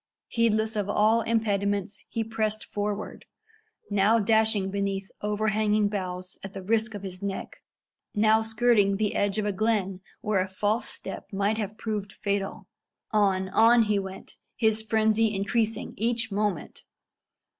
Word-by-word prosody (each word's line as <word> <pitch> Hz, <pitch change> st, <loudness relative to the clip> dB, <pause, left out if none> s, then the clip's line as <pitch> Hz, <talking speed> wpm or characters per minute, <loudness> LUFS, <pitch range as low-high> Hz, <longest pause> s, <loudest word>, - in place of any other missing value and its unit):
Heedless 220 Hz, -1 st, +1 dB
of 205 Hz, -1 st, -1 dB
all 215 Hz, +3 st, +3 dB
impediments, 205 Hz, -3 st, 0 dB
he 225 Hz, -, -1 dB
pressed 215 Hz, -1 st, -2 dB
forward 205 Hz, 0 st, -4 dB, 0.7 s
now 205 Hz, +3 st, +4 dB
dashing 220 Hz, -2 st, +2 dB
beneath 195 Hz, -1 st, -2 dB
overhanging 210 Hz, 0 st, +1 dB
boughs 185 Hz, -2 st, -5 dB
at 195 Hz, 0 st, -7 dB
the 190 Hz, -, -7 dB
risk 220 Hz, +2 st, 0 dB
of 200 Hz, -, -7 dB
his 185 Hz, -1 st, -7 dB
neck 200 Hz, -1 st, -4 dB, 0.6 s
now 215 Hz, +1 st, +4 dB
skirting 220 Hz, -3 st, +3 dB
the 210 Hz, 0 st, 0 dB
edge 200 Hz, 0 st, +1 dB
of 215 Hz, -, 0 dB
a 205 Hz, -, +1 dB
glen 195 Hz, -2 st, 0 dB, 0.2 s
where 210 Hz, -4 st, +1 dB
a 185 Hz, -, 0 dB
false 210 Hz, +5 st, 0 dB
step -, -, -7 dB
might 200 Hz, +2 st, 0 dB
have 210 Hz, 0 st, -4 dB
proved 210 Hz, -3 st, -4 dB
fatal. 200 Hz, -1 st, -3 dB, 0.4 s
On 195 Hz, -3 st, +2 dB
on 230 Hz, +3 st, +6 dB
he 210 Hz, -2 st, +1 dB
went, 190 Hz, -1 st, -8 dB, 0.2 s
his 220 Hz, -2 st, +2 dB
frenzy 220 Hz, 0 st, +2 dB
increasing 220 Hz, +3 st, -1 dB
each 230 Hz, 0 st, 0 dB
moment. 205 Hz, -5 st, -2 dB
210 Hz, 145 wpm, -27 LUFS, 200-220 Hz, 0.7 s, on